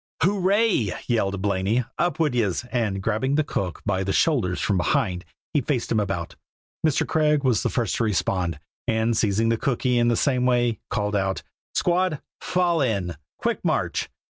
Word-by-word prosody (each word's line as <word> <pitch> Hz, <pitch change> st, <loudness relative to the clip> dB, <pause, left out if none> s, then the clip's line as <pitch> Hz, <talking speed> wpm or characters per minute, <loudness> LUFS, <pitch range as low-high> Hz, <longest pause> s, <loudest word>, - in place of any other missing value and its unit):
"Hooray!" 195 Hz, -, +2 dB
yelled 100 Hz, -5 st, 0 dB
Blaney; 100 Hz, +5 st, +1 dB
"up 175 Hz, 0 st, +1 dB
wid 155 Hz, -5 st, +2 dB
yez!" 110 Hz, -3 st, 0 dB
and 105 Hz, -6 st, -1 dB
grabbing 115 Hz, +6 st, 0 dB
the 155 Hz, -, +3 dB
cook 90 Hz, -, -3 dB
by 95 Hz, -1 st, 0 dB
the 95 Hz, -, -1 dB
shoulders 115 Hz, -, +2 dB
from 100 Hz, -, +1 dB
behind, 90 Hz, 0 st, 0 dB, 0.3 s
he 145 Hz, -, +3 dB
faced 125 Hz, -1 st, -2 dB
him 110 Hz, -, +3 dB
about. 95 Hz, -5 st, -3 dB, 0.5 s
Mr. 155 Hz, -2 st, +2 dB
Craig 150 Hz, -2 st, +2 dB
was 125 Hz, -6 st, +2 dB
the -, -, 0 dB
first 120 Hz, -6 st, -1 dB
to -, -, +1 dB
respond, 90 Hz, -5 st, 0 dB, 0.3 s
and 110 Hz, +1 st, +1 dB
seizing 110 Hz, +1 st, +2 dB
the 115 Hz, -, +2 dB
cookee 125 Hz, -2 st, +1 dB
in 120 Hz, -, +3 dB
the 120 Hz, -, +3 dB
same 125 Hz, -3 st, +2 dB
way, 120 Hz, -2 st, +2 dB
called 105 Hz, 0 st, -1 dB
out: 95 Hz, -1 st, -1 dB, 0.3 s
"Squad, 175 Hz, -3 st, +1 dB, 0.2 s
fall 175 Hz, -3 st, +1 dB
in! 100 Hz, -9 st, 0 dB, 0.2 s
quick -, -, -1 dB
march!" -, -, 0 dB
115 Hz, 170 wpm, -24 LUFS, 100-145 Hz, 0.5 s, the